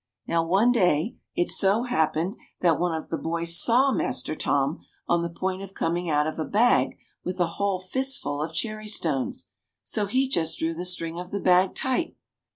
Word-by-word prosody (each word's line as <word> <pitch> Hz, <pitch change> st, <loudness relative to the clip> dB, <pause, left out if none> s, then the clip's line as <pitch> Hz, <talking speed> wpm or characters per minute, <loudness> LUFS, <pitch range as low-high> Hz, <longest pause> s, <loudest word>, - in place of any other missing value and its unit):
Now 165 Hz, -1 st, +1 dB
one 195 Hz, +8 st, +3 dB
day 185 Hz, -1 st, +2 dB, 0.2 s
it 175 Hz, -, +1 dB
so 200 Hz, +4 st, +2 dB
happened 170 Hz, -3 st, 0 dB, 0.3 s
that 170 Hz, -3 st, +3 dB
one 175 Hz, 0 st, +1 dB
of 160 Hz, -, -6 dB
the 165 Hz, -, -2 dB
boys 170 Hz, +1 st, +1 dB
saw 255 Hz, +4 st, +4 dB
Master -, -, -1 dB
Tom -, -, 0 dB, 0.3 s
on 170 Hz, 0 st, +2 dB
the 170 Hz, -, -2 dB
point 185 Hz, +2 st, -3 dB
of 195 Hz, 0 st, -9 dB
coming 170 Hz, +1 st, -1 dB
out 150 Hz, -1 st, +2 dB
of 155 Hz, +1 st, -4 dB
a -, -, 0 dB
bag 225 Hz, +8 st, +2 dB, 0.3 s
with 185 Hz, +1 st, -4 dB
a 175 Hz, -, +4 dB, 0.2 s
whole 200 Hz, -2 st, +1 dB
fistful 185 Hz, -, -1 dB
of 155 Hz, +1 st, -3 dB
cherry 215 Hz, +5 st, -3 dB
stones. 155 Hz, -10 st, -1 dB, 0.3 s
So 210 Hz, -2 st, -1 dB
he 260 Hz, +6 st, +1 dB
just 165 Hz, -9 st, 0 dB
drew 165 Hz, +1 st, -1 dB
the 175 Hz, +2 st, -5 dB
string 170 Hz, -2 st, -1 dB
of 180 Hz, 0 st, -7 dB
the 200 Hz, -, -3 dB
bag 185 Hz, 0 st, +3 dB
tight. 260 Hz, +6 st, -1 dB
180 Hz, 190 wpm, -26 LUFS, 165-215 Hz, 0.3 s, saw